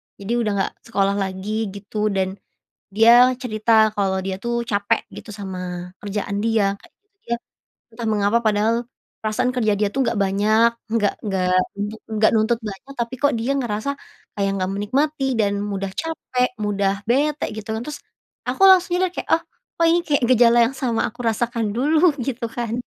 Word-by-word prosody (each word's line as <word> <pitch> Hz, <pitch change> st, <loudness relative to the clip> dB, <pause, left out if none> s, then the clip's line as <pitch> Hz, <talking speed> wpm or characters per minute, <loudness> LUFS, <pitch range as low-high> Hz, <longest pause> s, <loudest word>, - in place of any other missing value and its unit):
jadi 200 Hz, +3 st, -7 dB
udah 220 Hz, -3 st, 0 dB
nggak 195 Hz, -, -1 dB
sekolah 200 Hz, -3 st, +1 dB
lagi 195 Hz, +3 st, -2 dB
gitu 210 Hz, +1 st, -3 dB
dan, 190 Hz, -1 st, -1 dB, 0.5 s
dia 235 Hz, +4 st, +7 dB
cerita 220 Hz, -3 st, +2 dB
kalau 190 Hz, -2 st, 0 dB
dia, 190 Hz, 0 st, -3 dB
tuh, 235 Hz, +3 st, -3 dB
capek 200 Hz, -2 st, +1 dB, 0.2 s
gitu 215 Hz, -, -9 dB
sama 180 Hz, -2 st, -6 dB
kerjaan 200 Hz, 0 st, -3 dB
dia, 215 Hz, -3 st, +2 dB
kayak -, -, -20 dB
gitu. 410 Hz, -1 st, -51 dB
Dia, 235 Hz, 0 st, -1 dB, 0.6 s
entah 225 Hz, 0 st, -4 dB
mengapa 210 Hz, +2 st, +2 dB
padahal 225 Hz, +2 st, +1 dB, 0.3 s
perasaan 250 Hz, +4 st, 0 dB
kerja 220 Hz, -5 st, +1 dB
dia 205 Hz, 0 st, 0 dB
itu 270 Hz, -, -1 dB
enggak 235 Hz, -3 st, +1 dB
banyak, 210 Hz, +4 st, +3 dB, 0.2 s
enggak 220 Hz, -2 st, +1 dB
enggak 190 Hz, -3 st, -1 dB, 0.2 s
enggak 210 Hz, +2 st, -4 dB
enggak 220 Hz, 0 st, +3 dB
nuntut 225 Hz, +1 st, +2 dB
banyak, 215 Hz, +6 st, -7 dB
tapi, 235 Hz, +1 st, -3 dB
kok, 285 Hz, 0 st, +3 dB
dia 235 Hz, +5 st, -1 dB
ngerasa 240 Hz, -2 st, -2 dB, 0.4 s
kayak 200 Hz, -1 st, -1 dB
nggak 185 Hz, 0 st, -1 dB
menikmati 270 Hz, +5 st, 0 dB
dan 200 Hz, -2 st, +1 dB
mudah 195 Hz, -2 st, -3 dB
capek, 255 Hz, -, -1 dB
mudah 200 Hz, -1 st, -1 dB
bete 290 Hz, +6 st, +1 dB
gitu, 215 Hz, +1 st, -8 dB
kan. 230 Hz, -, -5 dB
Terus, 300 Hz, -1 st, -7 dB, 0.5 s
aku 390 Hz, -, +2 dB
langsung, 370 Hz, -2 st, +6 dB
ya, 370 Hz, -, +2 dB
udah 365 Hz, -, -2 dB
kayak, -, -, -6 dB
oh, 330 Hz, -, -9 dB, 0.3 s
kok, 335 Hz, -, +2 dB
ini 335 Hz, +1 st, +4 dB
kayak 295 Hz, -6 st, 0 dB
gejala 240 Hz, 0 st, +5 dB
yang 230 Hz, -, -1 dB
sama 240 Hz, -4 st, 0 dB
aku 245 Hz, -, -5 dB
rasakan 225 Hz, -1 st, -1 dB
dulu 310 Hz, +7 st, +4 dB, 0.2 s
gitu, 240 Hz, -3 st, -3 dB
kan. 230 Hz, -1 st, -4 dB
220 Hz, 175 wpm, -22 LUFS, 200-245 Hz, 0.6 s, dia